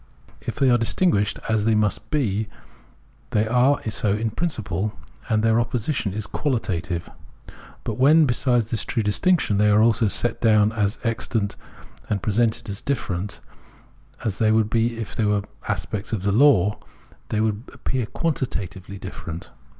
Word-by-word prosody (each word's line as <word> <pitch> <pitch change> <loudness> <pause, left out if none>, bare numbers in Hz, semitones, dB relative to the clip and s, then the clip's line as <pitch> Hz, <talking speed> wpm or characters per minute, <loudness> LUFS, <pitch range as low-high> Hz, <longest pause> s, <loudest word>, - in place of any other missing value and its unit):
If - - -5
they 135 -2 +3
are 120 - +4
distinguished, 110 - +1
as 110 -2 +1
they 110 -1 +3
must 105 -1 0
be, 110 -8 0 0.8
they 110 +1 +1
are 125 +4 +3
so 105 -1 +1
in 110 +1 -1
priaciple, 105 - -2 0.4
and 110 -1 +2
their 115 0 +4
opposition 120 -1 -1
is 105 +2 -3
qualitative. 95 - -2 0.8
But - - -4
when, 155 +4 +6
besides 120 -3 +1
this 110 - +1
true 115 - -1
distiaction, 110 - +2
they 105 0 +4
are 105 +1 +5
also 115 0 +3
set 115 +3 0
down 110 -2 +4
as 105 -2 0
existent 115 -2 -1 0.5
and 105 - 0
presented 110 +3 0
as 100 -1 -4
different, 100 -8 -3 0.8
as 105 -4 -2
they 110 -1 +4
would 110 -1 +2
be 115 0 +1
if 115 -1 -6
made 105 -2 +1 0.2
aspects 100 +1 -3
of 100 -4 -2
the 100 - +1
law, 105 -5 +4 0.5
then 110 0 +1 0.2
they - - -14
appear 125 -4 -2
quantitatively 100 - -3
distinct. 85 -3 -8
110 Hz, 150 wpm, -23 LUFS, 100-120 Hz, 0.8 s, when